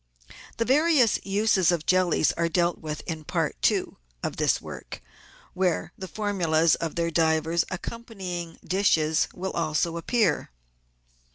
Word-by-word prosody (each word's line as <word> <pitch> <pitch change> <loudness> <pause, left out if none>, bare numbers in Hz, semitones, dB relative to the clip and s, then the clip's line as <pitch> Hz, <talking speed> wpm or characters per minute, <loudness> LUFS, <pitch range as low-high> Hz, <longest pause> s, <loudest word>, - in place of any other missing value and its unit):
The 230 - 0
various 280 -3 +4
uses 195 -3 +2
of 170 -3 -1
jellies 185 -4 +3
are 170 0 -1
dealt 175 0 +1
with 155 -1 -5
in 160 -2 -5
Part - - -2
II. - - -3 0.3
of - - -3
this - - +2
work, - - -9 0.5
where 180 -2 0
the 190 - -7
formulas 170 -5 +1
of 165 -2 -2
their 170 -1 0
divers 160 +1 +2
accompanying 185 -4 -6
dishes 160 -4 +2
will 190 +1 -5
also 165 +1 -1
appear. 205 0 +1
175 Hz, 130 wpm, -26 LUFS, 165-195 Hz, 0.5 s, various